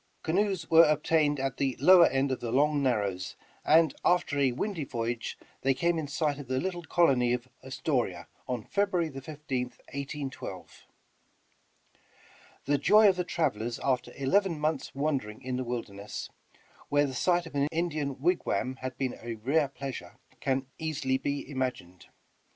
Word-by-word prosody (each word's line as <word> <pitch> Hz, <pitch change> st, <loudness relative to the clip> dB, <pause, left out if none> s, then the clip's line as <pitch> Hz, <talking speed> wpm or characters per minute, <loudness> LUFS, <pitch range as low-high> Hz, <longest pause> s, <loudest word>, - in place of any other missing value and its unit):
Canoes 190 Hz, 0 st, 0 dB
were 165 Hz, +1 st, +8 dB
obtained 150 Hz, -1 st, +2 dB
at 135 Hz, -1 st, -2 dB
the 135 Hz, -3 st, 0 dB
lowed 175 Hz, +2 st, +7 dB
end 135 Hz, +1 st, +1 dB
of 130 Hz, -, -1 dB
the 115 Hz, -, -4 dB
Long 145 Hz, +3 st, +3 dB
Narrows, 100 Hz, -8 st, -1 dB, 0.3 s
and 160 Hz, -1 st, +5 dB
after 170 Hz, -5 st, +2 dB
a 135 Hz, -2 st, +3 dB
windy 175 Hz, -, -3 dB
voyage 120 Hz, -2 st, -3 dB, 0.2 s
they 135 Hz, 0 st, +2 dB
came 170 Hz, +3 st, +1 dB
in 155 Hz, -, -4 dB
sight 145 Hz, 0 st, -1 dB
of 140 Hz, -, -8 dB
the 130 Hz, +1 st, 0 dB
little 180 Hz, 0 st, -3 dB
colony 135 Hz, -8 st, +3 dB
of 125 Hz, 0 st, -3 dB, 0.2 s
Astoria 125 Hz, -, -2 dB, 0.2 s
on 125 Hz, -3 st, -2 dB
February 190 Hz, -5 st, 0 dB
15th, 135 Hz, -2 st, -5 dB, 0.2 s
1812. 140 Hz, -, -6 dB, 1.8 s
The 145 Hz, 0 st, +2 dB
joy 210 Hz, +7 st, +6 dB
of 190 Hz, -, +2 dB
the 180 Hz, -, -1 dB
travelers 120 Hz, -10 st, -1 dB
after 130 Hz, -2 st, 0 dB
eleven 165 Hz, +5 st, +1 dB
mouths' 155 Hz, -1 st, -2 dB
wander 140 Hz, -6 st, 0 dB
ing 105 Hz, +5 st, -12 dB
in 130 Hz, 0 st, -2 dB
the 130 Hz, -, -2 dB
wilderness, 105 Hz, -4 st, -5 dB, 0.6 s
where 145 Hz, 0 st, +3 dB
the 135 Hz, -, -4 dB
sight 175 Hz, +6 st, +2 dB
of 165 Hz, -, -10 dB
an 140 Hz, 0 st, +1 dB
Indian 155 Hz, -5 st, -2 dB
wig 175 Hz, +5 st, +1 dB
wam 130 Hz, 0 st, -1 dB
had 130 Hz, -1 st, -6 dB
been 130 Hz, -2 st, -2 dB
a 115 Hz, 0 st, -5 dB
rare 140 Hz, +7 st, +1 dB
pleasure, 135 Hz, -1 st, -7 dB, 0.2 s
can 135 Hz, 0 st, 0 dB
easily 140 Hz, -5 st, -1 dB
be 140 Hz, +1 st, -3 dB
imagined. 130 Hz, -10 st, -4 dB
140 Hz, 160 wpm, -29 LUFS, 130-160 Hz, 1.8 s, were